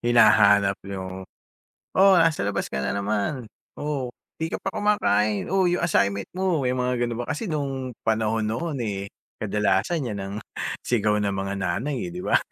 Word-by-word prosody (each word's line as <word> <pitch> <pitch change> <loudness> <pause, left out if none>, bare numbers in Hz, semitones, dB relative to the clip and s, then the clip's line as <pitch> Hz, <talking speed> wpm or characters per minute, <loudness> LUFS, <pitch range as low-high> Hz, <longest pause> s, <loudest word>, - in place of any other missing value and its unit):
Hinahanap 105 -4 +5
'yung, 95 -1 -6 0.6
"Oh, 195 +1 +6
nasa 165 - +3
labas 100 -1 -2
ka 65 - -2
na 65 - -1
naman. 105 +4 -2 0.2
Oh, 140 -4 -3 0.2
di 160 - -1
ka - - -5
pa 195 - -1
kumakain, 110 - +1
oh, 190 -1 +3
'yung 175 -1 +1
assignment 100 - +1
mo," 180 -5 0
may 125 - +1
mga 125 -1 0
ganun 120 -1 -1
ba, 120 - -3
kasi 190 +4 -4
nung 135 -4 -2 0.2
panahon 110 0 +1
noon, 140 +7 -2
eh, 100 -4 -3 0.3
kadalasan 105 - +1
'yan 105 -4 -4
ang 100 +1 -5 0.5
sigaw 105 -3 +2
ng 100 -1 0
mga 95 +1 -2
nanay, 125 - -2
eh, 175 - -6
'di 180 - -5
ba? - - +3
115 Hz, 175 wpm, -25 LUFS, 100-150 Hz, 0.6 s, Oh